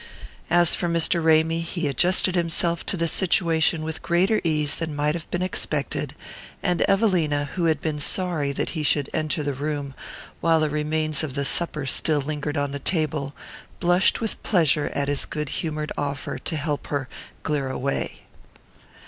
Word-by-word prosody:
As 175 -1 +4
for 175 - -1
Mr. 170 0 +1
Ramy, 160 +1 +4
he 170 -1 -2
adjusted 180 +6 +2
himself 170 -1 +1
to 195 - 0
the 165 0 +1
situation 165 -3 +2
with 160 0 -4
greater 190 +6 +2
ease 150 -3 +1
than 160 -3 -4
might 150 +1 +1
have 170 -1 -6
been 175 +1 -1
expected, 185 - -2 0.5
and 180 -2 +1
Evelina, 170 -9 +2
who 175 -2 0
had 160 -3 +2
been 155 -2 -2
sorry 160 -3 0
that 140 - -2
he 160 - -3
should 145 -1 +1
enter 155 0 -1
the 145 -1 -1
room 145 0 -3 0.5
while 165 -1 +3
the 155 -1 +1
remains 155 0 0
of 145 -3 -4
supper 150 -2 0
still 150 +3 +2
lingered 145 +1 -3
on 145 -1 0
the 140 - -4
table, 150 -3 -1 0.4
blushed 175 +1 +4
with 225 - -2
pleasure 160 -7 +2
at 140 0 0
his 145 -1 0
good 150 -2 -3
humored 155 -1 -3
offer 140 0 -3
to 165 - -3
help 150 -1 -2
her 140 -3 -2 0.4
"glear 145 -4 -1
away." 135 +1 -2
155 Hz, 165 wpm, -24 LUFS, 145-170 Hz, 0.5 s, As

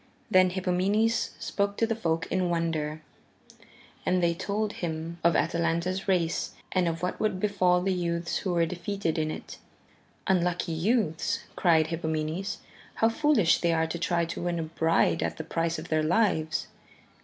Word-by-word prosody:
Then 185 -2 +6
Hippomenes 190 +5 +1
spoke 200 0 -2
to 230 - +3
the 225 - 0
folk 165 -6 -1
in 185 -1 +1
wonder, 160 -2 -1 1.0
and 180 -1 +1
they 170 0 +3
told 205 +4 -2
him 165 0 -4
of 170 -1 +4
Atalanta's 170 +3 0
race 175 -4 0 0.2
and 185 -2 +2
of 165 +1 -3
what 180 - -2
would 210 -4 0
befall 185 -3 +2
the 195 0 +1
youths 170 -1 -1
who 190 - -2
were 170 -1 +3
defeated 175 0 -2
in 155 0 0
it. - - -7 0.7
"Unlucky 180 -2 +1
youths," 205 +3 0
cried 160 -3 +3
Hippomenes, 160 +3 -2 0.4
"how 225 - +3
foolish 255 - +3
they 170 -1 +2
are 160 0 +2
to 160 +1 -4
try 170 0 +1
to 170 - -5
win 175 -1 -1
a 165 - -1
bride 165 +1 +1
at - - -2
the 160 - -4
price 165 +1 -1
of - - -8
their 155 -1 +2
lives." 160 -2 +1
170 Hz, 165 wpm, -28 LUFS, 165-190 Hz, 1.0 s, Then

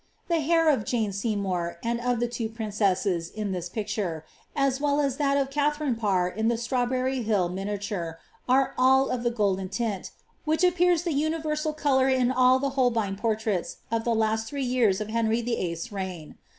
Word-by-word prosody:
The 335 -1 +2
hair 330 +2 +2
of 275 -8 +3
Jane 220 -3 -1
Seymonr. 195 -4 -2
and 235 +1 -1
of 245 -1 0
the 240 - +1
two 235 -2 -3
princesses, 200 -5 0
in 215 -2 -4
this 180 -2 -4
picture, 185 -6 -3 0.3
as 275 -1 +1
well 290 0 +2
as 275 -3 0
that 280 -1 +2
of 275 -1 0
Kailianne 295 -3 0
Parr 190 -5 +2
in 220 +5 -2
the 235 0 +2
Sirawborry 255 +2 -1
Hill 205 -5 +1
miniature, 195 -3 -4 0.3
are 265 +1 +3
all 265 +1 +4
of 250 - -1
the 240 - +1
golden 195 -5 0
tint, 205 -2 -3 0.4
vrhich 320 +4 +3
ap{>ears 355 -1 +2
the 340 -3 -1
universal 310 +1 -1
colour 270 -3 +2
in 255 -1 +2
all 255 0 +5
the 275 +1 -1
Holbein 230 -7 +1
portraits 215 -3 -1
of 230 0 0
the 235 0 +1
last 220 0 0
three 280 +1 -3
years 235 -6 +2
(»f 210 - -3
Henry 230 +1 +1
VIII.'s 185 -4 -3
reign. 185 -6 -6
230 Hz, 180 wpm, -26 LUFS, 200-270 Hz, 0.4 s, all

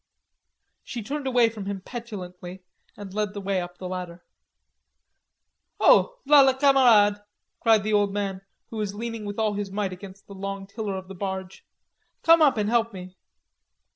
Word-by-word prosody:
She 235 -2 -6
turned 280 +5 -4
away 245 -3 +4
from 210 -3 -8
him 200 -1 -3
petulantly 185 -6 -8 0.3
and 200 -2 -9
led 210 0 -2
the - - -4
way 195 -1 -1
up 175 0 -8
the 185 - -6
ladder. 180 -1 -7 1.5
"Oh, - - +5
v'la 290 -1 +8
le 265 -1 +3
camarade," 240 -7 +5 0.4
cried 225 -3 +4
the 215 +1 -1
old 205 -1 +2
man 195 -2 -3 0.3
who 225 - -6
was 205 -2 -3
leaning 230 0 -5
with 205 0 -6
all 220 -2 +1
his 205 -1 -4
might 195 -1 -2
against 190 +1 -12
the 200 - -12
long 195 0 -5
tiller 200 -1 -5
of 185 0 -8
the 195 - -9
barge. 190 0 -6 0.6
"Come 330 0 +6
and 235 -9 +3
help 230 0 +1
me." 185 0 -9
205 Hz, 170 wpm, -25 LUFS, 190-230 Hz, 1.5 s, v'la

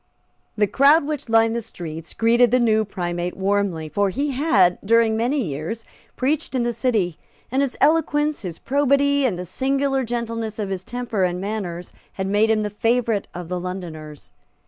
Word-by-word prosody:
The 210 - +4
crowd 280 - +4
which 295 -5 -4
lined 225 0 +4
the 235 - -1
streets 165 -7 -8
greeted 235 +2 +4
the 250 +3 +3
new 220 -2 +3
Primate 175 -2 -4
warmly. 195 -4 0
For 200 +5 0
he 280 +8 -1
had, 250 - +3
during 225 +1 +3
many 245 +6 0
years, 165 +8 -5 0.3
preached 280 +2 -1
in 250 - +1
the 240 0 0
City; 220 - 0 0.3
and 265 +2 +1
his 275 -2 -1
eloquence, 300 -1 +2
his 175 -4 -6
probity 280 0 +2
and 195 -7 -2
the 180 - -5
singular 270 +7 0
gentleness 230 -2 -3
of 205 -3 -3
his 190 -1 -4
temper 240 -4 -2
and 180 0 0
manners, 185 -4 -5 0.2
had 190 - -3
made 205 +3 +2
him 215 -1 +2
the 210 - -3
favourite 225 0 0
of 175 -1 -6
the 180 +1 -3
Londoners. 165 -5 -7
220 Hz, 175 wpm, -22 LUFS, 185-255 Hz, 0.3 s, The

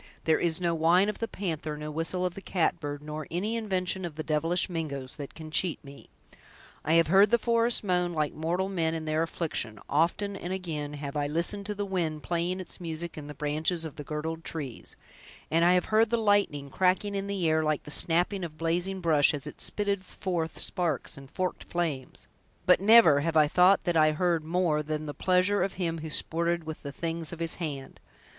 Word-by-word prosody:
There 160 -1 +3
is 165 -1 +1
no 170 -2 +1
whine 170 +5 +4
of 210 - -4
the 230 - -2
panther, 160 -7 -4
no 150 0 -5
whistle 165 +4 -2
of 180 - -1
the 195 - -9
catbird, 145 -6 -1
nor 150 0 -6
any 200 +7 -2
invention 190 -4 -2
of 170 -4 -5
the 155 - -4
devilish 165 +3 +1
Mingoes, 140 -7 -5
that 145 -2 -8
can 155 -1 -9
cheat 175 +1 +1
me! 140 0 -13 0.7
I 155 - +1
have 165 0 +6
heard 195 +6 +5
the 235 - +4
forest 235 0 +2
moan 180 -2 +1
like 155 -2 -1
mortal 170 +4 -1
men 165 -4 -1
in 160 -1 -4
their 155 +1 0
affliction; 160 -9 -3
often, 175 +7 +1
and 180 -1 -5
again, 160 -6 -4
have 145 -1 -6
I 145 -1 0
listened 170 +6 -1
to 210 - -3
the 205 0 -2
wind 165 -6 -2
playing 175 +2 -1
its 185 0 -8
music 170 0 -5
in 150 -2 -8
the 150 - -8
branches 155 +4 0
of 155 - -7
the 145 - -7
girdled 160 +2 -4
trees; 140 -9 -6 0.6
and 165 +1 +3
I 175 +1 +6
have 180 -1 +2
heard 220 +1 +5
the 235 - +2
lightning 205 -10 +1
cracking 190 +4 +1
in 200 0 -2
the 195 -4 -1
air 160 0 +2
like 155 -1 0
the 150 - -9
snapping 175 +5 +2
of 155 -2 -6
blazing 175 +4 -1
brush 155 -3 +4
as 140 - -4
it - - -9
spitted 200 -2 0
forth 175 -4 -3
sparks 175 -4 -2
and 135 -2 -12
forked 185 +3 -3
flames; 155 -7 -3 0.4
but - - +5
never 205 -8 +7
have 160 +2 0
I 150 -1 +6
thought 180 +5 +5
that 175 - 0
I 155 -1 +5
heard 170 0 +1
more 165 -2 +1
than 155 0 -3
the 145 - -5
pleasure 185 +4 +2
of 190 +1 0
him 165 -3 -2
who 160 0 -6
sported 170 +2 0
with 160 0 -7
the 140 - -6
things 165 +1 -3
of 170 - -6
his 165 -1 -2
hand. 140 -5 -5
165 Hz, 210 wpm, -28 LUFS, 155-185 Hz, 0.7 s, never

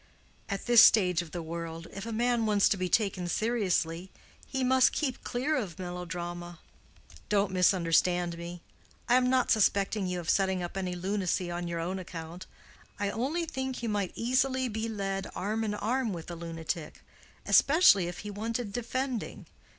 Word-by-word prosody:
At 200 -1 -3
this 240 -1 +8
stage 180 -6 +5
of 170 - -9
the 170 +2 -5
world, 165 0 -6
if 195 +3 -6
a - - -4
man 235 0 +1
wants 205 -2 +4
to - - +2
be 185 -1 -2
taken 195 -3 +1
seriously, 185 -4 0 0.4
he 265 -1 -2
must 260 0 +4
keep 265 -5 -2
clear 270 +6 -1
of 200 - -3
melodrama. 175 -1 -6 0.7
Don't 200 -1 +2
misunderstand 180 -1 +2
me. 170 +1 -8 0.4
I - - +3
am 250 0 +4
not 255 -1 +2
suspecting 200 -2 +2
you 180 0 -2
of 170 - -8
setting 190 -1 +1
up 175 - -6
any 185 -2 -2
lunacy 185 -1 -1
on 175 0 -3
your 170 0 -3
own 185 +3 -3
account. 170 0 -8 0.5
I 200 -1 0
only 290 +10 -1
think 265 -5 -4
you 230 - -1
might 205 -3 -1
easily 260 +2 +1
be 220 0 -3
led 195 -2 -3
arm 215 +4 -2
in 210 -1 -2
arm 235 +1 -1
with 170 0 -7
a - - -5
lunatic, 165 -1 -5 0.4
especially 280 - +5
if 175 - -6
he 210 - -4
wanted 220 +1 -3
defending. 250 0 -3
195 Hz, 170 wpm, -29 LUFS, 175-230 Hz, 0.7 s, this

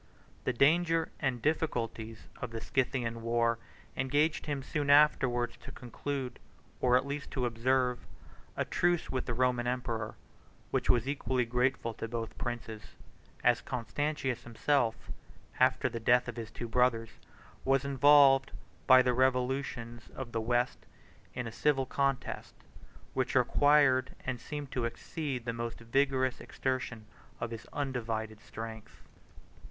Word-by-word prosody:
The - - +2
danger 165 +5 +3
and 125 -5 -1
difficulties 115 -8 -2 0.2
of 125 - -3
the 115 0 -5
Scythian 120 -2 -1
war 115 0 +1 0.4
engaged 145 +5 +1
him 145 -2 -2
soon 145 0 -2
afterwards 130 -5 +4
to - - -11
conclude, 130 +2 -5 0.4
or 125 0 +4
at 130 - -1
least 140 0 -5
to 130 -2 -1
observe, 125 +1 +1 0.6
a - - 0
truce 175 -1 +1
with 130 -1 -2
the 120 - -1
Roman 125 -1 +1
emperor, 120 -3 -2 0.6
which - - -1
was 120 0 +3
equally 130 -3 0
grateful 125 -1 0
to 115 - -5
both 115 -1 -4
princes; 115 -3 -5 0.5
as - - +4
Constantius 130 +1 -2
himself, 120 0 0 0.5
after 130 +1 +4
the 115 -2 -4
death 125 +2 +3
of 120 - -5
his 115 -3 -6
two 120 - -6
brothers, 115 -1 +1 0.4
was 135 0 +2
involved, 140 0 +6 0.4
by 130 -1 +8
the 125 - +2
revolutions 125 -2 -1
of 130 -3 -6
the 115 - -1
West, 120 +2 0 0.5
in 120 - -3
a 115 - -5
civil 135 +3 +1
contest, 135 0 -2 0.6
which - - -1
required 145 -3 +4
and 125 -2 -3
seemed 145 -1 -6
to 125 -2 -1
exceed 130 +1 -4
the 115 - -2
most 115 0 -4
vigorous 130 +2 +1
exertion 125 -4 -3 0.3
of 115 - -3
his 115 0 -7
undivided 110 -6 -3
strength. 110 -1 -9
125 Hz, 135 wpm, -31 LUFS, 115-135 Hz, 0.6 s, by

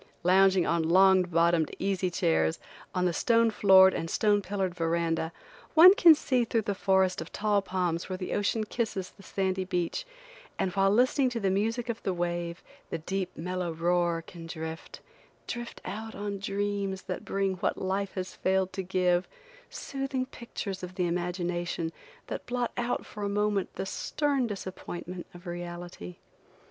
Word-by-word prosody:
Lounging 190 0 +5
on 170 0 +1
long 185 +3 +5
bottomed, 170 -2 +2
easy 190 -1 0
chairs, 80 - +1 0.4
on 180 0 +1
the 175 - +1
stone 230 +3 +3
floored 190 -2 +7
and 165 - -3
stone 205 +1 +2
pillared 195 -2 -2
verandah, 165 -1 0 0.4
one 355 +4 +10
can 340 -5 +8
see 255 -4 +1
through 225 -1 0
the 200 - -1
forest 190 -2 +2
of 160 - -8
tall 205 -1 +1
palms 180 -3 -2
where 185 - -3
the 185 - -4
ocean 205 +2 0
kisses 215 -4 -3
the - - -18
sandy 190 -1 -1
beach, 180 -2 -2 0.5
and 185 - 0
while 195 +1 +3
listening 255 +5 +3
to 240 -2 -3
the 195 -3 +1
music 225 +5 0
of 235 -1 -3
the 190 - -1
wave, 175 0 -3 0.3
the - - -2
deep, 185 +3 -3
mellow 180 +1 -3
roar, 170 0 +1
can 165 -1 -10
drift–drift 175 - -8
out 220 +2 -6
on 205 -1 -4
dreams 200 -1 -2
that - - -5
bring 195 -1 -1
what - - -1
life 190 +1 -2
has 185 -1 -4
failed 190 0 0
to 190 - -2
give; 180 -1 +1 0.4
soothing 270 -1 -3
pictures 230 -7 -6
of 180 0 -7
the 180 - 0
imagination 175 -1 -2 0.3
that - - -6
blot 245 -1 -1
out 245 0 -1
for 210 - -9
a 200 - -1
moment 205 -1 0
the - - -3
stern 280 +5 0
disappointment 185 -3 -6
of 175 +2 -13
reality. 175 - -7
190 Hz, 160 wpm, -29 LUFS, 175-205 Hz, 0.5 s, one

